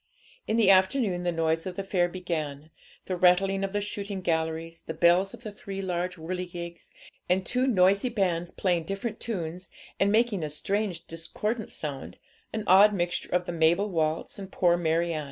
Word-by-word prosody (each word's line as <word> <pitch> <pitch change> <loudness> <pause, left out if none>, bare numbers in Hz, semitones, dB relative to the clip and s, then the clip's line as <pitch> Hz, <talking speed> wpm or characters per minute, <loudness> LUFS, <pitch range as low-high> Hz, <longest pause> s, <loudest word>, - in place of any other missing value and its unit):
In 220 - +1
the 210 -4 +6
afternoon 190 0 +3
the 175 0 0
noise 165 0 0
of 180 - -5
the 195 - -3
fair 180 -2 +1
began, 160 -5 -4 0.3
the 185 - -2
rattling 195 +2 +3
of 195 - -2
the 205 +1 -1
shooting 200 -1 -4
galleries, 165 -1 -2
the 160 - -6
bells 180 +5 +3
of 240 - -19
the 215 - -6
three 200 -1 -7
large 180 0 -2
whirligigs, 175 0 -6 0.4
and 185 +1 +2
two 250 +1 +1
noisy 200 +1 +3
bands 180 -6 0
playing 175 -4 0
different 205 +4 -4
tunes, 180 -5 -4 0.3
and 200 +1 +3
making 220 -3 +2
a 155 - -2
strange, 190 +3 -2
discordant 210 +7 -3
sound, 145 -3 -5 0.3
an 220 -1 -3
odd 200 +3 +7
mixture 175 -2 -2
of 180 0 +1
the - - -3
'Mabel 170 +5 +2
Waltz,' 160 +2 -1
and 195 -1 -8
'Poor 175 -1 +3
Mary 170 0 +1
Ann.' 155 - -2
180 Hz, 180 wpm, -27 LUFS, 170-200 Hz, 0.4 s, odd